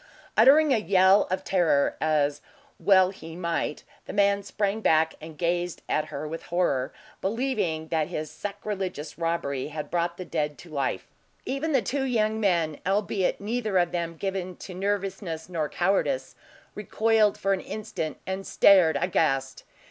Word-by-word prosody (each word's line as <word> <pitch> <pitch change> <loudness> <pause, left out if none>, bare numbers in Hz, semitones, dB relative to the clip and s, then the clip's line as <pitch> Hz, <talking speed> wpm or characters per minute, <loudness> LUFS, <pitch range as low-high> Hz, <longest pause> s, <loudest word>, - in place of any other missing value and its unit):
Uttering 280 +6 +6
a - - +3
yell 190 -1 +4
of 185 - -2
terror, 170 -7 +2
as 145 -2 +1 0.4
well 190 -2 +5
he 165 -4 -10
might, 170 -3 -2 0.2
the - - -6
man 200 0 +3
sprang 205 +1 -2
back 160 -4 +3
and 155 -1 -10
gazed 175 +1 -1
at 155 - 0
her 145 +2 -6
with 165 +2 -5
horror, 170 -7 0 0.3
believing 200 -8 -1
that 160 -2 0
his 155 -3 -5
sacrilegious 190 -2 -5
robbery 165 -5 -1
had 150 0 -6
brought 170 0 -1
the 185 - -6
dead 150 -3 -2
to 170 - -13
life. 140 -3 -2 0.4
Even 275 +4 -2
the 265 -6 +2
two 270 +8 -1
young 220 -3 +1
men 170 -7 +1
albeit, 195 -1 0
neither 215 -1 -1
of 175 -1 +2
them 170 -1 -3
given 190 -1 -3
to 185 - -9
nervousness 190 -4 -3
nor 160 -5 -2
cowardice 195 - 0 0.4
recoiled 215 0 +2
for 195 0 +1
an 190 - -2
instant, 185 -7 -5
and 190 +1 -4
stared 175 -7 +5
aghast. 135 -6 0
180 Hz, 155 wpm, -26 LUFS, 160-205 Hz, 0.4 s, Uttering